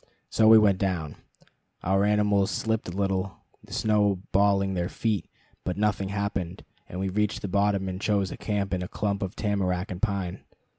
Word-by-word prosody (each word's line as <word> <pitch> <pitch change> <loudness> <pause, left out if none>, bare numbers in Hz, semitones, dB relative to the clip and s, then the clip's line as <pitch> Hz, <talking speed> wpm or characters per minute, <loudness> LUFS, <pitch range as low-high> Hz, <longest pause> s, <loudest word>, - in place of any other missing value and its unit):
So 110 - +4
we 110 0 +9
went 100 -3 +4
down. 85 -6 -2 0.7
Our 95 +2 +2
animals 105 -1 +3
slipped 110 0 -1
a - - -5
little, 95 0 -1 0.3
the - - -17
snow 105 -3 +1
balling 100 0 +3
their 90 -1 -1
feet; 110 -6 -1 0.4
but 90 0 -3
nothing 100 -2 0
happened, 100 -3 -3 0.3
and 90 - -6
we 95 - -1
reached 105 +2 -1
the - - -1
bottom 100 0 +1
and 95 +1 -4
chose 100 -3 +1
a - - -6
camp 100 -2 -2
in 90 - -1
a 90 - -3
clump 100 +1 -2
of 95 0 -3
tamarack 95 -3 -1
and 90 0 -6
pine. 100 -5 -1
100 Hz, 185 wpm, -27 LUFS, 95-105 Hz, 0.7 s, we